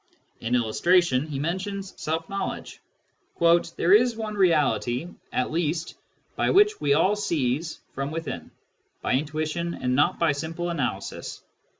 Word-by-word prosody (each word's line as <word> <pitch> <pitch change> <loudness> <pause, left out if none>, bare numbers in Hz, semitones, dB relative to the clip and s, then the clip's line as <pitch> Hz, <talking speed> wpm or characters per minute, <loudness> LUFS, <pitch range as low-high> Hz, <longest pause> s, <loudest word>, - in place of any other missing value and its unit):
In 120 +2 0
illustration, 135 +5 +3
he 145 -3 -4
mentions 190 +6 -3
self 160 +1 -2
knowledge: 195 -1 -4 0.3
" 170 - +1
there 175 +3 +4
is 240 +2 +5
one 220 -1 -4
reality, 155 - +2 0.2
at 125 - -1
least, 160 0 -1 0.4
which 415 +2 +4
we 140 -1 +3
all 185 +6 +3
seize 160 -5 -1
from 135 +1 -3
within, 165 +1 -5 0.5
by - - +1
intuition 155 +4 -1
and 125 -1 -1
not 145 +3 +3
by 165 -3 +3
simple 165 +4 -3
analysis. 125 - -4
165 Hz, 130 wpm, -25 LUFS, 140-185 Hz, 0.5 s, is